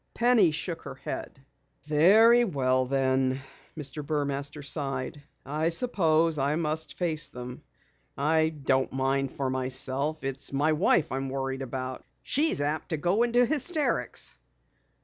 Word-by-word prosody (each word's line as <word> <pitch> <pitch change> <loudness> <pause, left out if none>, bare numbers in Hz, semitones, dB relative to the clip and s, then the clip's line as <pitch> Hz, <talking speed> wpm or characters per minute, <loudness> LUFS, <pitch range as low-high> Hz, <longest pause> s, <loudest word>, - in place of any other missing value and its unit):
Penny 235 -6 +4
shook 165 +2 -4
her - - -8
head. 135 0 -7 0.4
"Very 205 +11 +6
well 130 - +1
then," 130 0 +1 0.4
Mr. 150 0 -4
Burmaster 145 0 -2
sighed. 140 -1 -2 0.2
"I 155 +4 0
suppose 165 - +1
I 140 +2 +1
must 160 -1 -3
face 160 -4 0
them. 125 -2 -8 0.6
I 155 +2 +2
don't 135 -4 0
mind 135 0 0
for 135 -2 -1
myself. 130 +4 0
It's 135 0 -3
my 145 +3 +2
wife 160 0 +2
I'm 135 +1 -2
worried 135 0 -3
about. 130 0 -5 0.2
She's 300 - +1
apt 150 +2 -2
to 160 - -1
go 175 +8 +1
into 240 +1 +3
hysterics." 310 +3 -1
145 Hz, 130 wpm, -27 LUFS, 135-165 Hz, 0.6 s, Very